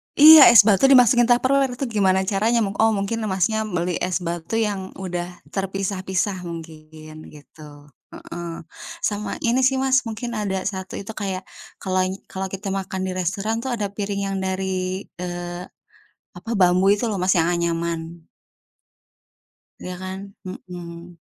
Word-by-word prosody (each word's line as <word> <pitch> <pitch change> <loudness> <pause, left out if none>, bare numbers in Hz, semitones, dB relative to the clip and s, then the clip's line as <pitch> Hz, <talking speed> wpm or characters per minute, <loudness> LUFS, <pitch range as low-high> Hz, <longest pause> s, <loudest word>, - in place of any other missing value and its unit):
Iya, 310 +1 +10
es 220 - +10
batu 210 +4 +4
dimasukin 245 -2 +6
Tupperware, 260 +1 +2
itu 255 - -5
gimana 190 -3 +2
caranya? 215 +4 +1
Mung 200 0 -4
oh, 220 0 +4
mungkin 200 +3 -2
Masnya 215 +4 0
beli 175 -2 -2
es 180 0 -2
batu 170 +4 -4
yang 205 -4 -2
udah 180 -2 -4 0.2
terpisah-pisah 190 -1 -2
mungkin, 155 -1 -10
gitu. 145 0 -15 0.2
Heeh, 170 -1 -8 0.4
sama 210 0 -2
ini 240 0 +2
sih 270 - 0
Mas 265 -1 +2
mungkin 225 +2 -5
ada 200 -4 -2
1 190 -2 -5
itu 200 +2 -6
kayak 195 -3 -4 0.3
kalau 185 -1 -2
ngi 190 +1 -7
kalau 190 0 -3
kita 195 +1 -5
makan 190 -1 -3
di 190 - -2
restoran 195 +5 -2
tuh 250 - -6
ada 205 -3 -3
piring 200 -1 -3
yang 195 - -2
dari, 190 0 -2 0.2
eee, 175 0 -5 0.7
apa, 230 - -7
bambu 185 +2 +4
itu 210 +4 +1
loh 215 - -2
Mas 185 0 +1
yang 165 - +2
anyaman. 170 -1 -2 1.6
Iya 180 - -5
kan? 185 0 -5 0.3
Mhm. 175 -1 -9
190 Hz, 150 wpm, -22 LUFS, 175-215 Hz, 1.6 s, Iya